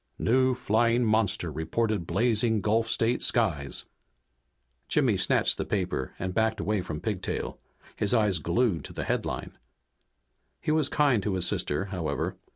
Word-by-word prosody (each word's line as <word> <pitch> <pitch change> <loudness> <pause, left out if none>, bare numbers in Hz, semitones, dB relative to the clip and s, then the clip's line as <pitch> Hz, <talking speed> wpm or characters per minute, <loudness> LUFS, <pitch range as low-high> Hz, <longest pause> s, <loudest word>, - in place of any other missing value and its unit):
NEW 130 +2 +2
FLYING 120 0 +2
MONSTER 110 -6 +1
REPORTED 85 - -1
BLAZING 115 -2 +2
GULF 115 +2 +1
STATE 115 +3 +1
SKIES 85 - 0 1.0
Jimmy - - +2
snatched - - +2
the - - +1
paper 90 -10 -2
and 95 -1 -3
backed 110 +1 +1
away 105 -1 0
from 80 -4 -5
Pigtail, 105 -5 -3 0.4
his 105 - 0
eyes 105 -7 +2
glued 85 - +1
to - - -8
the - - -4
headline. - - -3 1.0
He - - -1
was 155 -2 +2
kind 140 -7 +3
to 95 0 -1
his 90 -1 -1
sister, 75 0 0
however. 90 -5 -3
105 Hz, 145 wpm, -27 LUFS, 90-115 Hz, 1.0 s, kind